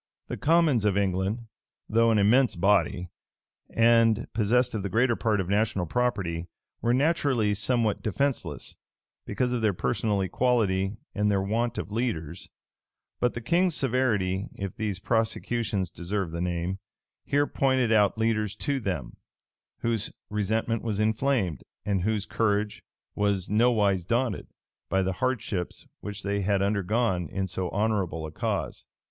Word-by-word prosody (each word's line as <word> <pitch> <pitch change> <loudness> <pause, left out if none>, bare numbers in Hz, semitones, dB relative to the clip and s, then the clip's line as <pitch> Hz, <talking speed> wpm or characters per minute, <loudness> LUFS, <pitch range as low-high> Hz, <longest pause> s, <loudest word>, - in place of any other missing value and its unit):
The - - -2
commons 160 -7 +3
of 100 -2 +2
England, 100 +4 0 0.4
though 115 +1 +3
an 110 - +3
immense 120 +6 +4
body, 90 -3 +1 0.6
and 115 -1 +4
possessed 120 +4 +2
of 110 - -2
the 100 - -3
greater 120 +5 +2
part 110 -3 +1
of 95 - -1
national 100 -2 +1
property, 90 -6 -1 0.3
were 120 - +2
naturally 130 -6 +2
somewhat 110 +1 +1
defenceless, 135 +6 -2 0.5
because 125 -1 0
of 125 -2 -1
their 105 -4 +2
personal 105 +2 0
equality, 100 -2 +1 0.2
and 105 0 +1
their 100 -1 +2
want 115 +4 -1
of - - -4
leaders: 95 -8 -3 0.7
but 125 - +1
the 120 - -4
king's 170 +6 +2
severity, 110 -8 +1
if 100 -2 -5
these 105 -3 -2
prosecutions 110 -3 0
deserve 90 0 -3
the 85 +1 -4
name, 90 +2 -2 0.4
here 145 +1 +2
pointed 130 -5 +1
out 105 -1 +4
leaders 110 -2 0
to 140 +5 -1
them, 90 - -4 0.6
whose 115 -2 -1 0.2
resentment 110 +2 0
was 110 -3 -2
inflamed, 110 - +1 0.2
and 100 -3 0
whose 105 +1 0
courage 105 -2 0 0.3
was 100 -2 0
nowise 105 -4 +3
daunted, 115 +2 -1 0.4
by 95 +1 +2
the 95 0 -1
hardships 115 -8 -2
which 105 0 -7
they 100 0 -1
had 100 0 +1
undergone 100 -3 0
in 95 -1 -2
so 90 -1 -3
honorable 95 -6 -1
a 80 - -7
cause. - - -3
105 Hz, 140 wpm, -27 LUFS, 95-120 Hz, 0.7 s, immense